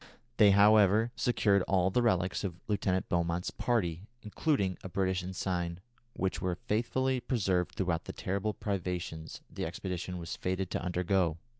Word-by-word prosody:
They, 105 -2 +7
however, 105 +2 +5
secured 105 -5 +2
all 95 -1 +2
the 125 - +2
relics 95 -6 +1
of 90 -3 -4
Lieutenant 95 -3 0
Beaumont's 85 0 -1
party, 95 -6 -1 0.2
including 105 - 0
a 95 - -6
British 95 0 0
ensign, 90 -2 -3 0.3
which 95 -1 -2
were 90 -1 0
faithfully 125 +7 0
preserved 95 -8 0
throughout 90 -3 -1
the - - -6
terrible 100 +3 -2
privations 90 -5 -4
the - - -6
expedition 90 -1 -4
was 85 -1 -5
fated 95 0 -2
to - - -1
undergo. 90 -1 +1
95 Hz, 145 wpm, -31 LUFS, 90-105 Hz, 0.3 s, They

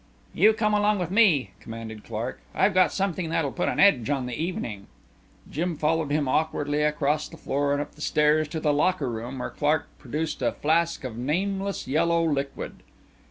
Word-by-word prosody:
"You 215 +6 +5
come 215 -1 0
along 210 0 +3
with 180 -2 -3
me," 195 - +4
commanded 110 -1 -8
Clark. 115 +3 -5
"I've 205 - +3
got 185 -4 +4
something 185 -3 -1
that'll 160 -4 0
put 175 - -1
an - - -2
edge 145 - +5
on 135 -3 0
the 125 - -5
evening." 120 - -4 0.6
Jim 170 +2 -2
followed 155 0 +1
him 145 -1 +1
awkwardly 145 +1 0
across 150 0 +1
the 165 - -12
floor 140 -1 -1
and 145 - +1
up 145 0 -5
the 150 - -15
stairs 150 0 +3
to 160 +2 -4
the 150 -1 +1
locker 150 -3 +1
room 120 +4 -5
where 125 - -4
Clark 150 +1 +1
produced 150 +4 -3
a - - +1
flask 165 +2 +1
of 120 -4 -5
nameless 195 +8 -2
yellow 165 +4 +2
liquid. 140 -3 -3
150 Hz, 185 wpm, -26 LUFS, 140-175 Hz, 0.6 s, You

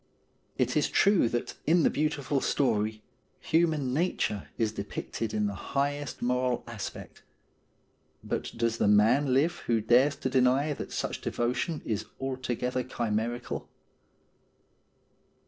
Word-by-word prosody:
It - - +1
is - - +2
true 195 - +4
that 120 0 -2
in 165 +1 +5
the - - +4
beautiful 145 -2 0
story 110 -5 0 0.4
human 155 -5 +1
nature 145 - 0
is 110 -3 +1
depicted 105 +1 -4
in 105 -1 0
the 100 - -1
highest 140 +7 -2
moral 125 0 +1
aspect; 115 -4 -7 1.0
but - - -3
does 115 0 0
the - - +3
man 110 +7 +4
live 145 +6 +2
who 115 -1 +3
dares 125 +6 +4
to 130 - -3
deny 130 +3 +3
that - - -7
such - - -3
devotion 125 +7 -1
is 110 -3 -2
altogether 130 -1 -2
chimerical 120 -1 -3
125 Hz, 125 wpm, -29 LUFS, 115-145 Hz, 1.0 s, in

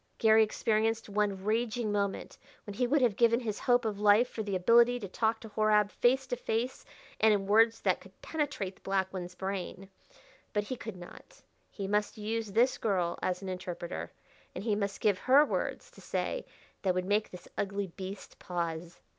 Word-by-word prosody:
Garry 220 0 +6
experienced 220 +1 0
one 200 -2 0
raging 220 +1 0
moment 200 -1 -2 0.3
when 205 - -6
he 245 +4 0
would 280 +1 +3
have 230 -5 +3
given 235 +1 +4
his 220 -4 -4
hope 245 -1 +2
of 210 -2 -2
life 210 +3 +5
for 230 - -5
the 205 -2 -2
ability 235 +6 +5
to 205 - -6
talk 220 +4 0
to 225 - -10
Horab 210 -1 +3
face 265 +2 +2
to 245 - -2
face 240 +1 -2 0.4
and 220 0 +5
in 195 -1 -2
words 225 +3 +4
that - - +1
could - - -17
penetrate 285 - -3
the - - -26
black 190 -1 -1
one's 180 -1 -6
brain. 190 0 -5 0.7
But 210 -1 +1
he 255 +5 -4
could 225 -4 -7
not. 175 -1 -13 0.3
He 200 -2 -5
must 210 +2 0
use 220 0 -3
this 240 +5 +3
girl 180 -5 0
as 185 +1 -2
an 190 - -4
interpreter, 180 -2 -5 0.4
and - - -5
he 220 -1 +1
must 200 -1 -2
give 205 -4 +2
her 275 +3 +6
words - - -3
to - - -16
say - - -3 0.3
that 185 -2 +1
would 185 0 -1
make 205 +2 +1
this 180 -1 -11
ugly 200 0 -2
beast 190 +2 -9
pause. 170 -1 -4
210 Hz, 190 wpm, -31 LUFS, 195-230 Hz, 0.7 s, Garry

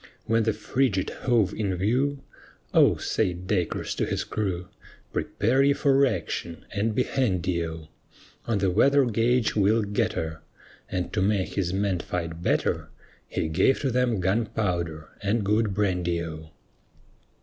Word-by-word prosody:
When 115 +1 +2
the 110 0 +2
frigate 105 -2 0
hove 115 -6 +1
in 100 -4 -1
view, 130 +9 0 0.5
"O," - - +5
said 90 0 -1
Dacres 90 -2 -1
to - - -1
his - - -1
crew, 95 -4 -3 0.5
"Prepare 120 +6 +1
ye 140 +1 +5
for 140 -1 +3
action 85 -5 -4
and 110 +1 -1
be 125 - +3
handy 90 -11 0
O; 80 -1 -6 0.6
On 115 -3 +1
the 95 -1 +1
weather 140 +8 +4
gauge 120 +1 +1
we'll 105 +2 +3
get 100 0 0
her." 80 0 -4 0.5
And 90 -1 -3
to 105 - +1
make 100 -1 +1
his 90 -3 -1
men 95 -1 0
fight 85 -1 -4
better, - - 0 0.4
He - - -2
gave 95 +12 +3
to 135 - 0
them 120 -3 +1
gunpowder 90 -6 -1
and 105 +2 0
good 105 -1 +1
brandy 90 -4 0
O. 80 -1 -8
100 Hz, 150 wpm, -26 LUFS, 90-115 Hz, 0.6 s, O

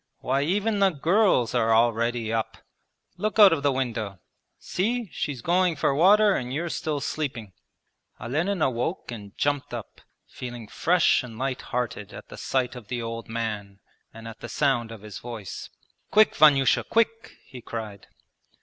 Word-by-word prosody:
Why 135 +2 0
even 205 +7 0
the 195 -1 +5
girls 170 - +2
are 115 -2 +3
already 115 0 +1
up! 115 -1 -2 0.6
Look 215 +1 -2
out 205 -5 +9
of 155 - -1
the 140 0 +2
window. 115 -7 -3 0.4
See, 225 +3 -2
she's 135 -6 -4
going 180 0 +2
for 140 - +1
water 200 +7 +5
and 125 0 -3
you're 165 +5 -2
still 155 -2 -2
sleeping!' 120 -10 -4 0.7
Olenin 160 - -1
awoke 125 +5 -2
and 100 -4 -9
jumped 145 -1 -1
up, - - -9 0.3
feeling 120 -3 -8
fresh 175 - +3
and 115 -3 -10
lighthearted 125 -5 -3
at - - -11
the - - -10
sight 130 -1 -1
of 120 -4 -10
the 125 +1 -3
old 115 -1 -5
man 105 -4 -4 0.3
and 115 0 -10
at 115 0 -10
the 120 - -8
sound 120 -4 +1
of 110 -3 -10
his 105 -2 -8
voice. 115 -5 -7 0.4
'Quick, 215 0 +5
Vanyusha, 140 -3 +5
quick!' 230 0 0
he 125 - -11
cried. 110 -4 -7
125 Hz, 160 wpm, -25 LUFS, 115-165 Hz, 0.7 s, out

